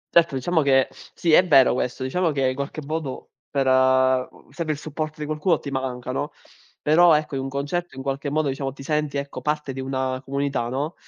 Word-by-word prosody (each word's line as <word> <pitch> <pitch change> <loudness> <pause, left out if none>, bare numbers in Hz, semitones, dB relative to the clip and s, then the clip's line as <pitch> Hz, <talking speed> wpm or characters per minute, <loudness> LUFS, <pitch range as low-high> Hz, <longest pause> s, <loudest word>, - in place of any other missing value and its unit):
Certo, 170 -4 +5
diciamo 160 +6 +1
che 135 -2 +4 0.3
sì 170 -3 +1
è 180 - +8
vero 135 -5 +6
questo, 125 +1 -2
diciamo 170 +7 0
che 135 -3 +1
in - - -1
qualche 140 +3 -5
modo 155 -3 -5 0.2
per 135 -2 0
ehm, 130 0 +2
serve 165 -3 -3
il - - -7
supporto 155 +1 -5
di 150 - -3
qualcuno, 155 +4 +1
ti 140 - -7
manca, 130 -2 -3
no. 145 +3 -2 0.5
Però 165 +2 +6
ecco, 150 -1 -1
in 135 - -1
un 135 - -4
concerto 145 +6 -3
in 135 - -5
qualche 140 +1 -2
modo 155 +1 0
diciamo 135 0 -3
ti 135 - -11
senti 150 0 -1
ecco, 140 0 -5
parte 150 -2 -2
di 135 - -7
una 130 -1 -2
comunità, 135 -3 -2
no. 140 +6 -2
140 Hz, 210 wpm, -23 LUFS, 130-155 Hz, 0.5 s, è